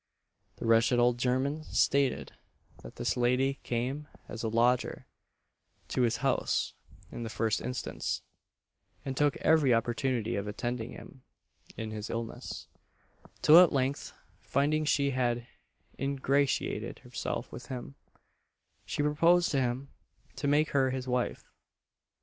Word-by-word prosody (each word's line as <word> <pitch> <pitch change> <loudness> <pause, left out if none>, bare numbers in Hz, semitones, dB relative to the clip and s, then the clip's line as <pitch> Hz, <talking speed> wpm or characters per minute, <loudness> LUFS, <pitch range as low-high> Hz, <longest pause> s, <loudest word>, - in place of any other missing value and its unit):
The - - -7
wretched 115 +2 +4
old 120 0 +3
German 130 +5 0
stated, 140 -3 +1 0.5
that - - -11
this - - -1
lady 125 +3 +1
came 130 +5 -2 0.2
as 115 - -6
a 115 - -1
lodger 120 +2 +1 0.8
to - - 0
his 120 -1 +2
house 135 - +1 0.4
in 120 - -6
the 115 - -4
first 110 0 0
instance, 125 +1 -3 0.8
and 135 -1 -3
took 145 0 +2
every 145 -6 +4
opportunity 115 0 0
of 100 +1 -3
attending 120 +2 -3
to - - -10
him 130 -2 -13 0.5
in 110 -1 -4
his 105 0 -5
illness; 115 0 -5 0.8
till 160 +3 +9
at 180 -2 +7
length, 135 +1 -1 0.3
finding 155 +2 +1
she 140 -2 +2
had 120 -2 0 0.5
ingratiated 140 0 0
herself - - -4
with - - -9
him, 130 +2 -6 0.9
she 145 - -1
proposed 165 +4 +4
to 135 -3 +2
him 130 +2 -2 0.5
to 145 - -2
make 150 +2 +3
her 135 -2 +3
his 130 0 -4
wife. 125 -1 -2
130 Hz, 130 wpm, -30 LUFS, 120-140 Hz, 0.9 s, till